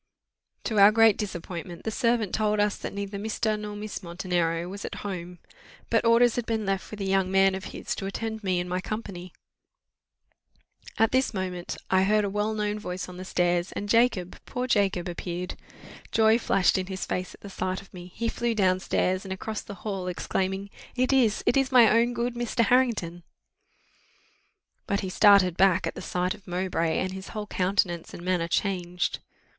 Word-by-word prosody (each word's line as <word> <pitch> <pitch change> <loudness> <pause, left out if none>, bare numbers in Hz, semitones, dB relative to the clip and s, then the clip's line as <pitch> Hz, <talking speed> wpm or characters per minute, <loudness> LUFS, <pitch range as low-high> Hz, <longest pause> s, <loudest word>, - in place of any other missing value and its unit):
To 215 -3 0
our 200 +1 +9
great 225 -1 +6
disappointment 175 -3 -6
the 220 - -2
servant 230 -2 +1
told 215 -1 +1
us 205 0 +2
that - - -6
neither 200 0 -5
Mr. 215 0 -1
nor 210 0 -6
Miss 210 0 -6
Montenero 170 -1 -1
was 200 +2 -7
at - - -5
home. 180 -2 -5 0.5
But 230 0 +3
orders 235 +1 +5
had 240 - -2
been 220 -2 -1
left 195 -1 -2
with 210 -1 -7
a - - -1
young 190 -1 +2
man 195 0 +4
of 190 0 -5
his - - -5
to 195 - -3
attend 220 +2 -4
me 185 -2 +1
and 175 - -3
my 180 +1 -2
company. 190 -4 -6 1.7
At 225 0 +3
this 260 -3 +1
moment 180 -2 -4
I 190 0 +5
heard 210 +2 +3
a 200 - -2
well 210 +2 -1
known 210 0 -1
voice 180 -3 -5
on 180 -1 -10
the 185 - -6
stairs, 175 -1 0
and 205 - -4
Jacob, 230 -5 +2
poor 250 0 -2
Jacob, 195 -7 +1
appeared: 175 +1 -4 0.6
joy 220 +1 +4
flashed 195 -4 +2
in 185 - -4
his 190 -1 -4
face 180 0 -3
at - - -24
the - - -9
sight 185 0 -2
of 200 - -16
me; 180 0 -10
he 230 - -1
flew 235 0 -1
down 185 -3 +3
stairs, 185 0 0
and 190 - -8
across 210 +3 -4
the 200 - -9
hall, 195 -3 -3
exclaiming, 190 +2 -2 0.2
"It 255 +1 +2
is 235 -6 +3
it - - +3
is 270 -1 +2
my 245 -3 +8
own 235 +2 +3
good 240 +1 -1
Mr. 240 -1 0
Harrington!" 220 -9 +1 1.7
But 200 - 0
he 190 - -4
started 195 -3 +6
back 190 -1 +4
at - - -2
the - - -8
sight 180 +1 -1
of 200 - -16
Mowbray, 175 -3 -1
and 185 - -1
his 190 0 -7
whole 210 - -3
countenance 185 -3 0
and 175 - -9
manner 180 -2 0
changed. 180 -2 -1
195 Hz, 195 wpm, -27 LUFS, 180-220 Hz, 1.7 s, our